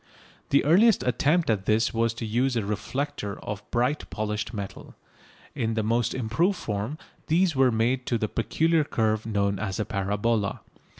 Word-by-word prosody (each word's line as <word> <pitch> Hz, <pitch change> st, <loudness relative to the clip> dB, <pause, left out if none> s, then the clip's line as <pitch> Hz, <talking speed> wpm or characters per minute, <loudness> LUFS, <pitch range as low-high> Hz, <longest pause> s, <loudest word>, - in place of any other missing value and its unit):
The 140 Hz, -, +3 dB
earliest 200 Hz, +7 st, +5 dB
attempt 150 Hz, +7 st, +2 dB
at 100 Hz, -3 st, -2 dB
this 110 Hz, +1 st, +2 dB
was 115 Hz, 0 st, +1 dB
to 115 Hz, -, -4 dB
use 125 Hz, +4 st, +1 dB
a 115 Hz, -4 st, 0 dB
reflector 105 Hz, 0 st, -3 dB
of 105 Hz, 0 st, -5 dB
bright 125 Hz, +5 st, 0 dB
polished 105 Hz, -1 st, -3 dB
metal. 100 Hz, -4 st, -7 dB, 0.6 s
In 110 Hz, 0 st, -1 dB
the 110 Hz, -, 0 dB
most 115 Hz, +2 st, 0 dB
improved 130 Hz, -, +1 dB
form 105 Hz, +7 st, -3 dB, 0.3 s
these 170 Hz, 0 st, +2 dB
were 130 Hz, -1 st, +4 dB
made 120 Hz, +3 st, 0 dB
to 120 Hz, -, +1 dB
that 110 Hz, -1 st, -3 dB
peculiar 160 Hz, +8 st, +2 dB
curve 110 Hz, -5 st, 0 dB
known 100 Hz, -2 st, 0 dB
as 95 Hz, -2 st, -3 dB
a 105 Hz, -, 0 dB
parabola. 105 Hz, +1 st, -1 dB
115 Hz, 165 wpm, -26 LUFS, 105-135 Hz, 0.6 s, earliest